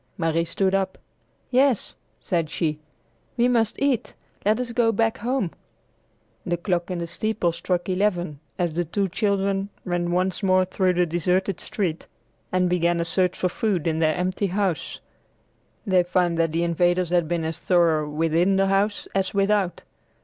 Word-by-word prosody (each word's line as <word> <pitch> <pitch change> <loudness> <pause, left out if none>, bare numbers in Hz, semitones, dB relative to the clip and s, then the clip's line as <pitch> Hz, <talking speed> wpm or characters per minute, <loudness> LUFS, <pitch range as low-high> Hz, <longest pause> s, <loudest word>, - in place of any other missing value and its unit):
Marie 165 0 +1
stood 190 +3 0
up. 195 -1 0 0.5
"Yes," 260 -2 +2 0.2
said 170 -4 -1
she; 155 -3 -1 0.6
"we 240 +1 +4
must 230 -3 +1
eat. 270 -4 0 0.3
Let 215 +3 +2
us 250 -1 -3
go 230 -1 +2
back 225 +1 0
home." 240 -5 -1 0.9
The 175 0 -1
clock 175 0 -1
in 180 - -2
the 170 - -3
steeple 180 +1 -1
struck 175 +1 -2
eleven 180 -6 0 0.2
as 175 -3 0
the 175 +2 0
two 195 +4 -1
children 200 0 0 0.2
ran 175 -1 -1
once 180 +2 0
more 185 -1 +3
through 185 0 +1
the 180 0 +2
deserted 180 +3 0
street 175 -6 -3 0.4
and 185 0 +2
began 175 -1 +1
a 170 - 0
search 180 +2 +1
for 185 - +1
food 195 -4 -1
in 160 -1 0
their 155 -1 +2
empty 185 +2 -1
house. 190 -3 -2 0.9
They 190 -3 +4
found 175 -1 +1
that 165 -1 +2
the 165 +2 0
invaders 175 +1 +1
had 175 -2 +2
been 170 0 -1
as 160 +1 -3
thorough 165 -5 +2
within 165 +5 +2
the 195 0 +3
house 200 +2 +1
as 195 0 -1
without. 195 -2 +1
180 Hz, 165 wpm, -24 LUFS, 170-200 Hz, 0.9 s, we